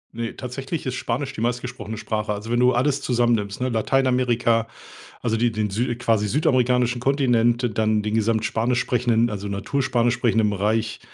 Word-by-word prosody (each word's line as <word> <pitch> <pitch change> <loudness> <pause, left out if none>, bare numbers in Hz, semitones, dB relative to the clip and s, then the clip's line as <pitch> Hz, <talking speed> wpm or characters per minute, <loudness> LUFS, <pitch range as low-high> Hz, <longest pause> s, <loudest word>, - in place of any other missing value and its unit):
Ne, 115 -1 -4
tatsächlich 135 +5 -5
ist 130 - -2
Spanisch 130 +3 -3
die 110 - -6
meistgesprochene 120 -3 -3
Sprache. 105 -1 -2
Also, 105 +3 -6
wenn 120 - +2
du 125 0 +4
alles 135 +3 +1
zusammennimmst, 120 -4 0
ne? 130 - 0
Lateinamerika, 120 -1 +1 0.6
also 115 -1 0
die 120 0 +2
den 105 -2 -2
sü 120 +3 -1
quasi 110 -3 +1
südamerikanischen 125 -2 +1
Kontinent, 120 -3 +2
dann 110 -1 +2
den 105 0 -2
gesamt 110 0 +1
Spanisch 115 +4 0
sprechenden, 120 -2 +1
also 100 0 -5
natur 100 +8 -2
Spanisch 120 -1 +1
sprechenden 110 -4 +1
Bereich, 105 +2 -1
120 Hz, 165 wpm, -23 LUFS, 110-125 Hz, 0.6 s, du